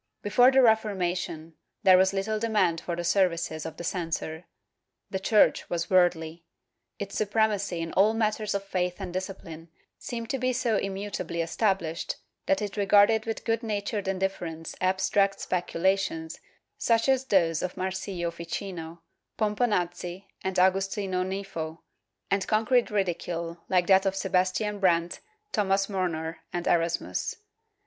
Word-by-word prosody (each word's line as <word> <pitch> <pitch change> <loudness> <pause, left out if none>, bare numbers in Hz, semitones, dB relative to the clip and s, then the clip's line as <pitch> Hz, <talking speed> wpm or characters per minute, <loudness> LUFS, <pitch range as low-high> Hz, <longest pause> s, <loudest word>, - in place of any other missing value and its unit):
Before 245 +5 +5
the 265 0 +5
Reformation 180 -7 0 0.3
there 190 -2 +8
was 190 +1 +4
little 200 +2 -1
demand 205 -7 +1
for 170 - -3
the 175 - -4
services 170 -4 +1
of 160 - -9
the - - -6
censor. 165 -2 -3 0.7
The 190 - -1
Church 210 +2 +3
was 170 +1 -2
worldly; 175 -2 +2 0.5
its 200 -1 -6
supremacy 205 -4 0
in 165 0 -4
all 210 +3 +4
matters 215 -2 0
of 200 - -1
faith 180 -2 -1
and 185 -3 -5
discipline 180 -3 -6 0.3
seemed 230 -2 -5
to 270 - -1
be 255 0 +1
so 235 -3 +1
immutably 195 -4 -3
established 170 -3 -1 0.3
that 290 -7 +2
it 205 0 -5
regarded 205 +2 +4
with 225 - -4
good 225 -1 +1
natured 210 -2 -2
indif 190 0 0
ference 165 -1 -6
abstract 195 +1 +2
speculations 180 -2 -1 0.4
such 230 +1 +2
as 265 -1 +2
those 170 -8 +2
of 180 - -3
Marsiglio 185 -2 -3
Ficino, 170 -1 -6 0.3
Pomponazzi 195 -4 -1 0.2
and 190 0 -2
Agustino 190 0 +1
Nifo, 185 -4 -5 0.5
and 195 -1 +1
concrete 225 +3 +2
ridicule 170 -4 -2
like 180 -2 +3
that 190 +1 +5
of 195 - 0
Sebastian 190 +2 0
Brandt, 175 -3 +2 0.3
Thomas 195 -2 +2
Murner 165 -5 -2
and 175 -1 -3
Erasmus. 170 0 0
190 Hz, 140 wpm, -27 LUFS, 175-205 Hz, 0.7 s, there